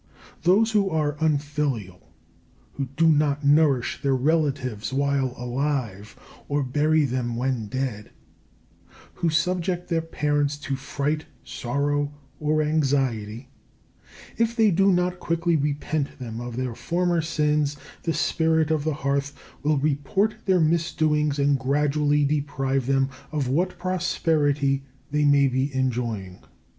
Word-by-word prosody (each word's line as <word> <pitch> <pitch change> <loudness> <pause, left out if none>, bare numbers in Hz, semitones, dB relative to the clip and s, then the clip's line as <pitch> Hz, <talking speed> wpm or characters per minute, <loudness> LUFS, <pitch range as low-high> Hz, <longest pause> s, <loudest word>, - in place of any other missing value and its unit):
Those 205 +6 +4
who 205 -3 +2
are 150 -3 0
unfilial, 145 - -2 0.6
who 140 - -3
do 165 0 +4
not 150 -2 +2
nourish 145 -5 +3
their 140 -2 +2
relatives 135 -6 0
while 135 -2 0
alive 120 -5 -3 0.3
or 145 0 +1
bury 150 +4 +2
them 125 -2 -2
when 125 -3 -1
dead, 120 -3 -3 1.0
who 170 - 0
subject 180 +2 0
their 165 -2 +1
parents 145 -2 0
to 135 - -2
fright, 140 +3 -3 0.2
sorrow, 140 +3 -1 0.3
or 155 0 +1
anxiety 130 -6 0 0.9
if 230 0 +1
they 220 -3 +4
do 195 +3 +4
not 180 0 0
quickly 170 0 0
repent 145 0 -1
them 115 -3 -6
of 120 -1 -6
their 130 -2 -2
former 175 +5 0
sins, 150 -2 0 0.2
the 165 - -1
spirit 160 0 +1
of 155 -2 +1
the 155 -1 -1
Hearth 140 0 -1 0.2
will 150 0 +2
report 150 +9 +1
their 185 -2 +3
misdoings 155 -2 +1
and 140 -1 +2
gradually 145 +2 +2
deprive 135 -3 -1
them 135 0 +2 0.2
of 150 -4 -1
what 175 +7 0
prosperity 150 -6 0 0.3
they 150 0 +2
may 140 -1 +5
be 130 +2 0
enjoying. 115 -8 -2
145 Hz, 130 wpm, -24 LUFS, 135-155 Hz, 1.0 s, may